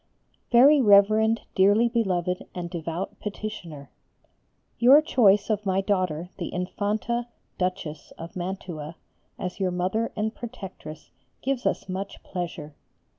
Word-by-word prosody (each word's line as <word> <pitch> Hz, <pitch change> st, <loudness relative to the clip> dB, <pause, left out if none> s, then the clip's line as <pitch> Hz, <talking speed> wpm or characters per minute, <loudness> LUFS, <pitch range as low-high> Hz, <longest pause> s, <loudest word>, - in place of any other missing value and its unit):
_ -, -, -44 dB
VERY 275 Hz, +4 st, +7 dB
REVEREND 215 Hz, +1 st, +5 dB
DEARLY 205 Hz, +5 st, +4 dB
BELOVED 180 Hz, -6 st, -1 dB
AND 175 Hz, -1 st, -5 dB
DEVOUT 170 Hz, +1 st, -5 dB
PETITIONER, 190 Hz, -9 st, -7 dB, 0.9 s
Your 260 Hz, +5 st, +8 dB
choice 220 Hz, -9 st, +3 dB
of 210 Hz, -1 st, 0 dB
my 190 Hz, -1 st, +1 dB
daughter, 185 Hz, -4 st, -1 dB
the 170 Hz, -, -4 dB
Infanta 210 Hz, +6 st, -2 dB, 0.3 s
Duchess 180 Hz, -5 st, -3 dB
of 165 Hz, +1 st, -9 dB
Mantua, 175 Hz, -4 st, -5 dB, 0.4 s
as 180 Hz, +2 st, -5 dB
your 190 Hz, -2 st, +1 dB
Mother 185 Hz, +6 st, -1 dB
and 215 Hz, +1 st, -1 dB
Protectress 190 Hz, -11 st, -9 dB, 0.3 s
gives 270 Hz, -2 st, 0 dB
us -, -, -2 dB
much 195 Hz, +1 st, -5 dB
pleasure. 170 Hz, -5 st, -5 dB
195 Hz, 125 wpm, -26 LUFS, 175-220 Hz, 0.9 s, Your